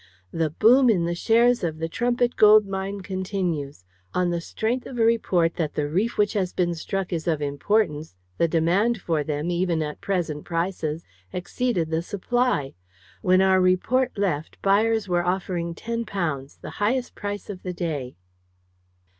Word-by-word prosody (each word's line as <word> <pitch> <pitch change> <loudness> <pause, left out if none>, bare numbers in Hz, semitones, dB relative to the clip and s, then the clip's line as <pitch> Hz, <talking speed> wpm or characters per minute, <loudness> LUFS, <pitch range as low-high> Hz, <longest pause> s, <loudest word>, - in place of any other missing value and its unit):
"The 165 -1 0
boom 240 - +5
in 180 -6 +2
the 170 - -1
shares 235 +5 +3
of 160 -2 -2
the 165 +1 -2
Trumpit 240 +5 0
Gold 215 0 +7
Mine 195 +1 -4
continues. 180 - -3 0.3
On 180 -1 +1
the 170 -1 -1
strength 230 +8 -2
of 250 - -8
a 225 - +3
report 180 -7 +2
that 160 -4 -2
the 150 -1 0
reef 195 +10 -1
which 210 0 +2
has 190 -4 -1
been 175 -1 0
struck 190 +3 -3
is 165 0 -3
of 160 -3 +1
importance, 150 - 0 0.2
the 170 - +4
demand 180 +8 +2
for 160 -4 -1
them, 150 +3 -2
even 175 -2 0
at 150 -1 -6
present 170 -6 -2
prices, 165 -2 -2 0.3
exceeded 180 -2 -2
the 160 +1 +1
supply. 205 - -1 0.5
When 185 0 +4
our 190 -1 +4
report 230 +8 +2
left, 175 -7 -2
buyers 215 +2 +2
were 175 -1 +1
offering 175 -2 -2
£10 190 -12 -4
the - - -7
highest 245 +4 0
price 205 -1 -5
of 195 -3 -7
the 180 - -4
day." 155 -8 -4
185 Hz, 165 wpm, -24 LUFS, 165-210 Hz, 0.5 s, Gold